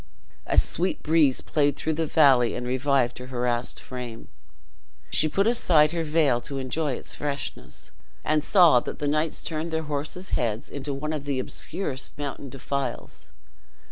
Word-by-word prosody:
A -, -, 0 dB
sweet 180 Hz, +4 st, +1 dB
breeze 155 Hz, -4 st, +3 dB
played 145 Hz, -2 st, +1 dB
through 160 Hz, -, -1 dB
the 160 Hz, +1 st, -1 dB
valley 135 Hz, -7 st, +4 dB
and 125 Hz, -, -4 dB
revived 130 Hz, -1 st, +1 dB
her 125 Hz, -, -8 dB
harassed 120 Hz, -1 st, -2 dB
frame. 125 Hz, -3 st, -8 dB, 0.8 s
She 155 Hz, -, +4 dB
put 195 Hz, +5 st, +1 dB
aside 165 Hz, -10 st, +4 dB
her 170 Hz, -1 st, -1 dB
veil 150 Hz, -6 st, +2 dB
to 135 Hz, +3 st, -6 dB
enjoy 135 Hz, +2 st, -1 dB
its -, -, -6 dB
freshness, 105 Hz, -, -5 dB, 0.3 s
and 155 Hz, -1 st, +2 dB
saw 170 Hz, -10 st, +6 dB
that -, -, -6 dB
the 145 Hz, -, -2 dB
knights 155 Hz, +2 st, 0 dB
turned 160 Hz, 0 st, -3 dB
their 160 Hz, 0 st, -2 dB
horses' 150 Hz, +5 st, -4 dB
heads 115 Hz, -2 st, -1 dB
into 140 Hz, 0 st, -5 dB
one 150 Hz, +3 st, -3 dB
of 145 Hz, -2 st, -4 dB
the 140 Hz, -2 st, -1 dB
obscurest 135 Hz, +2 st, -4 dB
mountain 140 Hz, -1 st, -5 dB
defiles. 135 Hz, -1 st, -5 dB
145 Hz, 160 wpm, -25 LUFS, 125-155 Hz, 0.8 s, saw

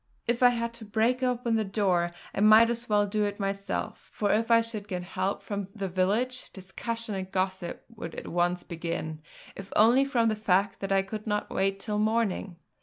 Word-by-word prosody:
If 235 Hz, +1 st, 0 dB
I 250 Hz, -, +8 dB
had 235 Hz, -1 st, -2 dB
to 235 Hz, -1 st, -10 dB
break 225 Hz, +4 st, +1 dB
open 245 Hz, -2 st, +1 dB
the 220 Hz, -, +1 dB
door 190 Hz, -4 st, +1 dB, 0.2 s
I -, -, -3 dB
might 215 Hz, +3 st, +7 dB
as 235 Hz, 0 st, -4 dB
well 205 Hz, -1 st, +3 dB
do 210 Hz, +1 st, 0 dB
it 205 Hz, 0 st, -4 dB
myself; 195 Hz, 0 st, -3 dB
for 205 Hz, -2 st, 0 dB
if 225 Hz, +2 st, +1 dB
I 230 Hz, 0 st, +7 dB
should 220 Hz, -3 st, -5 dB
get 180 Hz, -2 st, -3 dB
help 185 Hz, +2 st, -2 dB
from 200 Hz, -2 st, -4 dB
the 200 Hz, -2 st, -3 dB
village, 210 Hz, +8 st, 0 dB
discussion 225 Hz, +4 st, -4 dB
and 190 Hz, -1 st, -5 dB
gossip 185 Hz, -2 st, -2 dB
would 210 Hz, -8 st, -8 dB
at -, -, -7 dB
once 175 Hz, +1 st, 0 dB
begin, 165 Hz, -2 st, -4 dB, 0.3 s
if 195 Hz, 0 st, -9 dB
only 235 Hz, +5 st, +6 dB
from 245 Hz, -5 st, +2 dB
the 215 Hz, -, 0 dB
fact 200 Hz, -2 st, +1 dB
that 195 Hz, 0 st, -4 dB
I 195 Hz, 0 st, +3 dB
could 215 Hz, +3 st, -7 dB
not 210 Hz, -1 st, -1 dB
wait 195 Hz, 0 st, 0 dB
till 210 Hz, +1 st, -2 dB
morning. 215 Hz, -4 st, 0 dB
205 Hz, 200 wpm, -28 LUFS, 190-230 Hz, 0.3 s, I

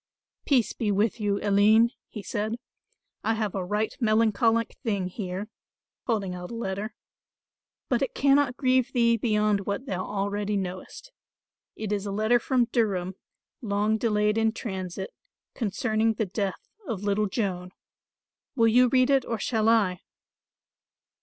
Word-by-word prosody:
"Peace 255 Hz, -6 st, +3 dB
be 215 Hz, -3 st, -1 dB
with 210 Hz, +3 st, +1 dB
you, 205 Hz, -1 st, 0 dB
Aline," 210 Hz, +3 st, +5 dB, 0.2 s
he 210 Hz, -, -8 dB
said. 215 Hz, +3 st, -2 dB, 0.7 s
"I 225 Hz, -, +1 dB
have 215 Hz, -3 st, -2 dB
a 190 Hz, -, -2 dB
right 210 Hz, +4 st, -1 dB
melancholic 225 Hz, 0 st, +2 dB
thing 200 Hz, -5 st, -1 dB
here," 190 Hz, +1 st, -5 dB, 0.6 s
holding 205 Hz, -6 st, 0 dB
out 180 Hz, 0 st, -7 dB
a 235 Hz, -, -6 dB
letter. 215 Hz, 0 st, -4 dB, 0.9 s
"But 245 Hz, -1 st, +1 dB
it 270 Hz, -, -2 dB
cannot 275 Hz, -2 st, +3 dB
grieve 255 Hz, -2 st, +2 dB
thee 235 Hz, -1 st, +4 dB
beyond 210 Hz, -3 st, +1 dB
what 200 Hz, +6 st, -2 dB
thou 185 Hz, -7 st, -3 dB
already 205 Hz, +1 st, -2 dB
knowest. 185 Hz, -, -6 dB, 0.6 s
It 215 Hz, -2 st, -5 dB
is 205 Hz, -1 st, -1 dB
a -, -, -3 dB
letter 215 Hz, +4 st, +2 dB
from 250 Hz, 0 st, +2 dB
Durham, 190 Hz, -6 st, 0 dB, 0.5 s
long 210 Hz, 0 st, 0 dB
delayed 210 Hz, -1 st, +1 dB
in 225 Hz, 0 st, +2 dB
transit, 190 Hz, -, -5 dB, 0.4 s
concerning 220 Hz, 0 st, 0 dB
the 220 Hz, -, 0 dB
death 195 Hz, 0 st, -4 dB, 0.2 s
of 210 Hz, -6 st, -4 dB
little 205 Hz, +1 st, +1 dB
Joan. 185 Hz, -4 st, -2 dB, 0.9 s
Will 230 Hz, -3 st, +4 dB
you 250 Hz, +3 st, +5 dB
read 255 Hz, +2 st, +3 dB
it 270 Hz, -2 st, +4 dB
or 230 Hz, -, -2 dB
shall 220 Hz, 0 st, +1 dB
I?" 200 Hz, -6 st, +2 dB
215 Hz, 145 wpm, -26 LUFS, 200-230 Hz, 0.9 s, Aline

